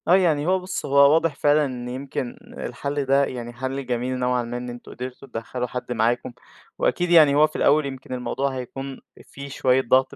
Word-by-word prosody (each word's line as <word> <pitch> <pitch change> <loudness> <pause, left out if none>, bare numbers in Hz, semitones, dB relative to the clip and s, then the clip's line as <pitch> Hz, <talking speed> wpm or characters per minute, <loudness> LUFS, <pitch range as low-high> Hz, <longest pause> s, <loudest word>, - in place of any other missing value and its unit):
آه 175 - +6
يعني 160 -5 +2
هو 190 +1 +3
بُصّ 185 +1 -5
هو 140 +1 +6
واضح 165 -2 +2
فعلًا 145 +2 +3
إن 125 -2 -5
يمكن 130 -1 -4 0.2
الحل 140 +3 -3
ده 140 +1 +4
يعني 120 -2 -6
حل 130 +2 -4
جميل 125 +1 -2
نوعًا 125 -1 +1
ما 120 +1 -5
إن 125 0 -6
أنتم 120 0 -10
قدرتوا 125 +2 -8
تدخّلوا 125 +1 -4
حد 125 0 -6
معاكم، 120 +1 0 0.5
وأكيد 175 0 +1
يعني 155 -5 +7
هو 150 +1 +6
في 155 - -19
الأول 150 +1 +3
يمكن 130 -1 -7
الموضوع 130 +2 -2
هيكون 135 +2 -6 0.2
في 140 0 -10
شوية 130 -1 +2
ضغط 130 +2 +2
130 Hz, 195 wpm, -23 LUFS, 125-145 Hz, 0.5 s, يعني